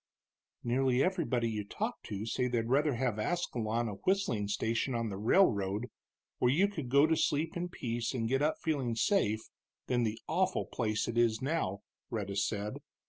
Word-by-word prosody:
"Nearly 130 +1 +2
everybody 160 -11 +1
you 105 -2 -2
talk 100 - -4
to 105 0 -4
say 125 +2 0
they'd 120 -2 -1
rather 145 0 +3
have 120 -3 -1
Ascalon 120 -6 -1
a - - -3
whistling 185 - +1
station 115 +5 0
on 115 -1 -1
the 100 - -4
railroad, 105 - +2 0.5
where 125 - +4
you 185 +9 +4
could 155 -11 -5
go 140 +3 +6
to 160 +1 +3
sleep 150 +1 0
in 175 +1 -2
peace 120 -7 -3
and 115 -2 0
get 135 +3 +1
up 155 +1 +2
feeling 135 -7 0
safe, 115 - +2 0.4
than 125 -1 +1
the 110 -1 -1
awful 185 +3 +1
place 110 -3 -1
it 115 0 0
is 115 -2 +3
now," 130 - -1 0.3
Rhetta 100 -4 -3
said. 105 0 -1
120 Hz, 175 wpm, -32 LUFS, 110-150 Hz, 0.5 s, go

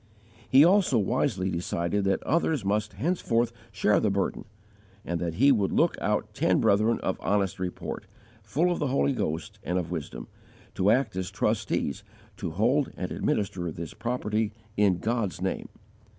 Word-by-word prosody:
He 135 +4 +7
also 180 - +4
wisely 95 -2 0
decided 85 +3 -1
that 95 -1 +1
others 155 -6 +1
must 105 +2 0
henceforth 120 -9 0 0.2
share 105 +1 +3
the 105 - +1
burden, 100 +1 -1 0.6
and 85 -1 -2
that 85 -1 -2
he 135 +9 +5
would 105 -7 +2
look - - +3
out - - -1
ten - - +2
brethren 110 +3 +3
of 95 - -2
honest 100 -4 0
report, 90 -1 -5 0.3
full 145 - +1
of 175 - -1
the 150 - 0
Holy 140 +1 +2
Ghost 100 0 -3
and 90 - -1
of 90 -1 -3
wisdom, 70 -8 -5 0.5
to 95 - +2
act 115 -3 +2
as 95 -1 -2
trustees 70 - -1 0.3
to - - -3
hold 120 - +1
and - - -4
administer 90 -4 -1
this 80 0 -7
property 110 -3 -1 0.2
in 100 -3 +3
God's 110 -3 -1
name. 95 +1 -3
105 Hz, 160 wpm, -27 LUFS, 90-120 Hz, 0.6 s, He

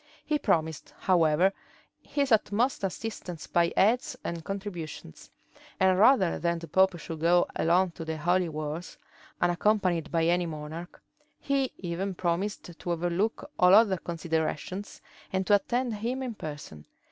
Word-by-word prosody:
He 300 -1 0
promised, 160 - -1
however, 175 +1 +3 0.5
his 280 -2 -1
utmost 220 +2 +2
assistance 185 -4 -5
by 170 -1 +2
aids 230 +6 +2
and 170 -1 -4
contributions; 180 - -7 0.5
and 190 -1 +4
rather 205 -6 +5
than 170 0 0
the 165 0 -8
pope 190 +3 +3
should 160 0 -7
go 175 +2 +4
alone 180 +2 +2
to 165 - -8
the 160 0 -3
holy 175 +2 +1
wars, 155 +2 -5 0.4
unaccompanied 175 -1 +1
by 165 -1 +2
any 175 +1 +2
monarch, 160 +2 -8 0.4
he 275 -2 0
even 185 +2 -3
promised 180 +4 -1 0.2
to 175 - -3
overlook 175 +6 -1
all 180 +1 +7
other 205 -3 +5
considerations, 170 +3 -3 0.3
and 190 0 0
to 205 - +3
attend 240 +4 +1
him 240 +5 -3
in 250 -3 -4
person. 145 - -8
180 Hz, 140 wpm, -28 LUFS, 165-205 Hz, 0.5 s, all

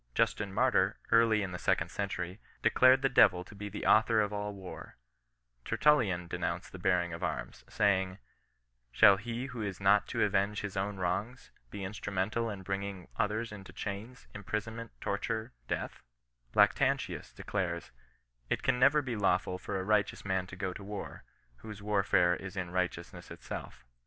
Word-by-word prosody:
Justin 100 -2 +1
Martyr, 95 - +2
early 115 -2 +5
in 95 - -4
the 90 - -5
•econd - - +1
century, 95 -1 -3 0.2
declared 130 +1 +5
the - - +5
devil 90 -8 +5
to 90 - -14
be 105 0 -6
the 100 - -6
author 110 0 +5
of 105 -1 +1
M 105 0 -3
war, 95 -2 -10 0.7
Tertullian 100 - +2
denounced - - -3
the - - -9
bearing 85 -2 +1
of 80 - -6
arms, 80 -6 -4
saying, 95 -2 +1 0.7
ShaU 95 +10 +7
he 120 +4 -4
who 125 -4 -6
is 100 -3 -4
not 100 +1 +4
to - - 0
avenge 100 0 +1
his 105 -1 -5
own 100 +1 -2
wrongs^ 100 +7 -3 0.2
be 100 - -7
itistrU" 100 +1 -5
mental 110 +5 0
in 100 -3 -6
hrinqing 95 -1 -4
others 110 +2 -1
into 95 -2 -9
chains, 105 +5 -6
imprisonment^ 110 +3 -4
torment, 110 +3 -2 0.2
death - - -4 0.3
/" - - -41
Lactantius - - +2
declares: 90 -4 -3 0.2
— 60 - -39
" - - -40
It - - -1
can 125 - +2
never 140 +3 +5
he 125 -2 -3
Jafwfutfor 95 -1 0
a - - -2
righteous 105 0 +1
man 95 -1 0
to 95 - -9
go 95 0 -3
to 100 - -9
war^ 100 0 -6 0.4
whose 105 - -9
warfare 95 -4 +3
is 95 +2 -8
in 90 -2 -3
righteousness 90 0 -3
itself.' 65 - -8
100 Hz, 170 wpm, -31 LUFS, 95-110 Hz, 0.7 s, ShaU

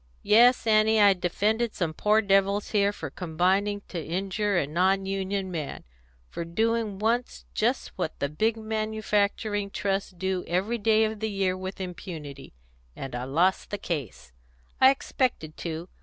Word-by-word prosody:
Yes, 240 +4 +5
Annie, 220 0 +4
I 205 -1 +7
defended 210 +6 0
some 165 -4 -1
poor 210 +6 +2
devils 195 +1 +2
here 200 -1 +3
for 205 - -7
combining 190 +4 0
to 170 -3 -4
injure 195 +4 -1
a 155 - +2
non 185 +6 +1
union 195 0 -2
man 155 -5 -5 0.4
for 170 - -5
doing 220 +4 0
once 225 - -1
just - - 0
what - - -2
the 140 - 0
big 220 +10 0
manufacturing 215 -1 -1
Trusts 195 0 -1
do 190 0 -3
every 195 +8 0
day 220 +1 +3
of 220 -1 -2
the 220 0 -2
year 195 -2 0
with 190 +1 -6
impunity; 160 - -8 0.4
and 135 -2 -7
I 125 +1 -3
lost 170 +8 +1
the 205 - -3
case. 115 - -5 0.5
I 260 - +8
expected 255 - -1
to. 165 +1 -5
195 Hz, 155 wpm, -27 LUFS, 175-215 Hz, 0.5 s, I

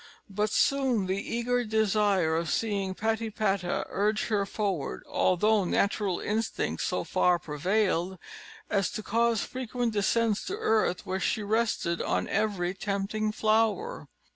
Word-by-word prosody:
But 210 +2 0
soon 255 -3 +2
the 190 +2 -1
eager 245 +1 +1
desire 210 -6 +2
of 165 0 -1
seeing 200 -4 -1
Patipata 215 -4 -1
urged 210 +3 0
her 200 -3 +1
forward, 195 -9 -2
although 210 +3 +2
natural 200 0 0
instinct 220 +2 -2
so - - -1
far 180 -1 +2
prevailed, 180 +3 0 0.5
as 195 -2 +1
to 215 - -4
cause 230 0 +1
frequent 245 -2 -3
descents 215 +1 +1
to 395 +2 -3
earth, 220 - +1
where 190 0 -2
she 215 - 0
rested 210 -5 0
on - - 0
every 195 -4 0
tempting 200 +2 -2
flower. 225 - 0
210 Hz, 130 wpm, -28 LUFS, 190-225 Hz, 0.5 s, soon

